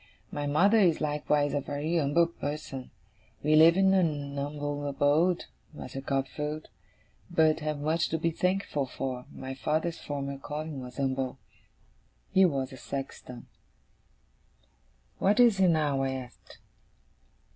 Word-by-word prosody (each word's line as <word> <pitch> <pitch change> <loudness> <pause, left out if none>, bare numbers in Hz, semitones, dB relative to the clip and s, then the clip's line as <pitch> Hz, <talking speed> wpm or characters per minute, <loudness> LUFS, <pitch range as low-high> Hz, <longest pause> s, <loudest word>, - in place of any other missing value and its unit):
My 145 0 -3
mother 195 +10 +4
is 175 -6 +4
likewise 150 -1 0
a 145 - 0
very 150 +5 -1
umble 150 +3 +3
person. 145 -5 -6 0.5
We 155 +1 +4
live 165 +3 +7
in 190 0 +4
a 190 - +5
numble 145 -1 -2
abode, 150 +5 +2 0.3
Master 135 -2 -7
Copperfield, 150 +3 -3 0.6
but 160 -3 +3
have 150 -2 -3
much 160 +3 0
to 160 - 0
be 165 +1 0
thankful 180 -5 -1
for. 130 -1 -4
My 130 0 -6
father's 160 +5 -1
former 140 -1 -4
calling 150 0 -5
was 125 +1 -9
umble. 135 -1 -1 0.9
He 190 0 +6
was 135 -6 -1
a - - -9
sexton.' 130 -2 -7 1.7
'What 205 +3 +3
is 235 -5 +6
he 190 - +5
now?' 150 -5 +2
I 135 0 0
asked. 125 -3 -10
145 Hz, 135 wpm, -29 LUFS, 135-165 Hz, 1.7 s, live